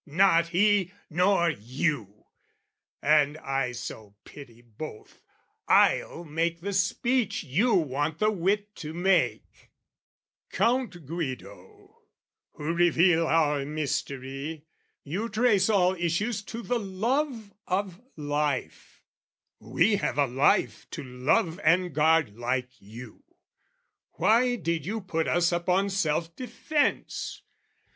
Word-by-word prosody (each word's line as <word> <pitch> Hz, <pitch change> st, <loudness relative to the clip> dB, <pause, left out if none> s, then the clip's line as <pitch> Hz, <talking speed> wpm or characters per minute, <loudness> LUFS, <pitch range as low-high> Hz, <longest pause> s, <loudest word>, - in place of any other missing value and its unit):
Not 170 Hz, +1 st, +4 dB
he, 190 Hz, +1 st, +2 dB, 0.2 s
nor 180 Hz, 0 st, +3 dB
you! 120 Hz, -, -3 dB, 0.8 s
And 150 Hz, 0 st, +3 dB
I 135 Hz, -4 st, -2 dB
so 110 Hz, -4 st, -8 dB
pity 120 Hz, -5 st, -13 dB
both, 115 Hz, +2 st, -10 dB, 0.5 s
I'll 170 Hz, -, +3 dB
make 165 Hz, +2 st, -2 dB
the 200 Hz, +3 st, -3 dB
speech 210 Hz, +3 st, 0 dB
you 200 Hz, -, +2 dB
want 150 Hz, -1 st, 0 dB
the 215 Hz, +3 st, +2 dB
wit 205 Hz, +2 st, -1 dB
to 155 Hz, 0 st, -7 dB
make: 185 Hz, +2 st, 0 dB, 0.8 s
"Count 235 Hz, -, 0 dB
Guido, 130 Hz, -, -7 dB, 0.5 s
who 155 Hz, +3 st, -3 dB
reveal 170 Hz, 0 st, +3 dB
our 150 Hz, -4 st, +2 dB
mystery, 140 Hz, 0 st, -4 dB, 0.4 s
"You 195 Hz, +11 st, -3 dB
trace 215 Hz, -3 st, +2 dB
all 185 Hz, -3 st, +3 dB
issues 190 Hz, +6 st, -1 dB
to 230 Hz, +1 st, -7 dB
the 245 Hz, +1 st, -1 dB
love 225 Hz, +3 st, -2 dB
of 185 Hz, 0 st, -2 dB, 0.2 s
life: 145 Hz, -, -3 dB, 0.6 s
"We 205 Hz, 0 st, +2 dB
have 150 Hz, -, -2 dB
a 145 Hz, -, +4 dB
life 130 Hz, +1 st, +1 dB
to -, -, -5 dB
love 130 Hz, +6 st, 0 dB
and 175 Hz, +1 st, +3 dB
guard, 150 Hz, -7 st, +2 dB
like 125 Hz, +1 st, -2 dB
you. 110 Hz, +3 st, -12 dB, 0.9 s
"Why 245 Hz, +3 st, +3 dB
did 170 Hz, -8 st, -2 dB
you 215 Hz, +7 st, -3 dB
put 165 Hz, -4 st, -2 dB
us 175 Hz, 0 st, +2 dB
upon 180 Hz, +3 st, +1 dB
self 165 Hz, -3 st, -1 dB
defence? 260 Hz, +5 st, -2 dB
170 Hz, 110 wpm, -27 LUFS, 145-200 Hz, 0.9 s, Not